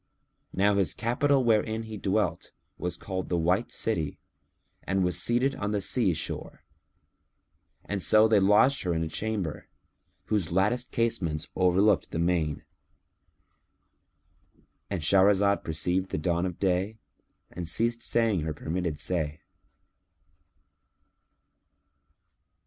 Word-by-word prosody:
Now 100 +1 +2
his 95 -3 +1
capital 135 +4 +1
wherein 110 -1 +1
he 110 -1 -8
dwelt, 105 - -1 0.3
was 90 - -3
called 95 -1 -5
the 90 - 0
White 90 +7 0
City 85 -10 -2 0.6
and 95 0 -1
was 90 0 +1
seated 125 +3 +1
on 105 +1 -2
the 105 - +1
sea 100 -3 +2
shore; - - -5 1.4
so 110 +3 +5
they 110 -2 +4
lodged 105 +8 +4
her 90 -3 -1
in 80 - -1
a - - -2
chamber, 100 -3 -4 0.6
whose 100 -6 -1
latticed 105 +8 +1
casements 90 -10 -1
overlooked 95 +2 +3
the - - -5
main.——And 85 +2 -8
Shahrazad 100 +3 +4
perceived 90 +4 -1
the - - -3
dawn 85 +3 0
of 90 - -6
day 95 +3 0 0.5
and 85 -1 -5
ceased 115 +5 0
saying 115 -6 +1
her 80 0 -4
permitted 80 0 -3
say. 75 0 -2
95 Hz, 115 wpm, -27 LUFS, 85-110 Hz, 1.4 s, so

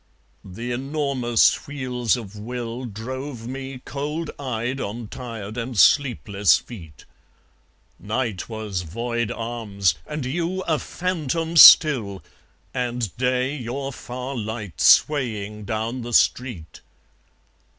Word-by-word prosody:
The 115 +6 -6
enormous 135 -3 +1
wheels 130 -4 -1
of 105 -4 -9
will 120 +3 -5
Drove 120 +2 -6
me 130 0 -7
cold 150 +3 -4
eyed 125 0 -3
on 110 +2 -5
tired 115 -4 -7
and 120 0 -4
sleepless 105 - +4
feet. 80 - -12 0.9
Night 110 -2 -3
was 110 -5 -4
void 120 +6 -3
arms 110 -6 -1
and 150 -3 -4
you 170 +7 -2
a 155 -4 0
phantom 165 -2 -2
still, 125 - +8 0.5
And 120 -5 -2
day 125 +2 0
your 135 +1 -4
far 125 +3 -6
light 110 -4 -5
swaying 105 -7 +3
down 115 +4 -3
the 120 0 -6
street. 115 - +1
120 Hz, 110 wpm, -23 LUFS, 110-135 Hz, 0.9 s, still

